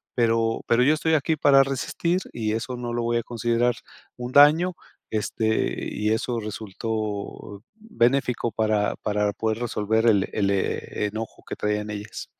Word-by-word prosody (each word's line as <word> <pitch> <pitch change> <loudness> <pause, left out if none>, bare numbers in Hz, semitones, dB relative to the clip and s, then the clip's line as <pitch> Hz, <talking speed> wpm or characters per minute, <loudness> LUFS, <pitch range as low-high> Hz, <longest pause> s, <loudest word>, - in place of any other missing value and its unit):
pero 115 -1 +1
pero 120 +1 +4
yo 145 +4 +5
estoy 160 +1 0
aquí 155 +2 +1
para 140 -2 +5
resistir 140 +6 -1
y 110 -2 -1
eso 125 +3 -3
no 120 -1 -4
lo 120 0 -1
voy 120 0 +1
a 115 - -1
considerar 120 +1 0 0.4
un 125 0 -5
daño, 155 +6 +6 0.4
este, 110 +1 -1
y 105 +1 0
eso 115 +2 -1
resultó 105 -1 -5
benéfico 135 - 0
para 110 -1 +1
para 105 -1 0
poder 110 +1 -2
resolver 110 -1 0
el 100 -4 +3
el 100 -2 +1
e 100 +1 -1
enojo 110 +2 -6
que - - -5
traían 105 0 -2
ellas. 105 0 -6
115 Hz, 155 wpm, -24 LUFS, 105-125 Hz, 0.4 s, daño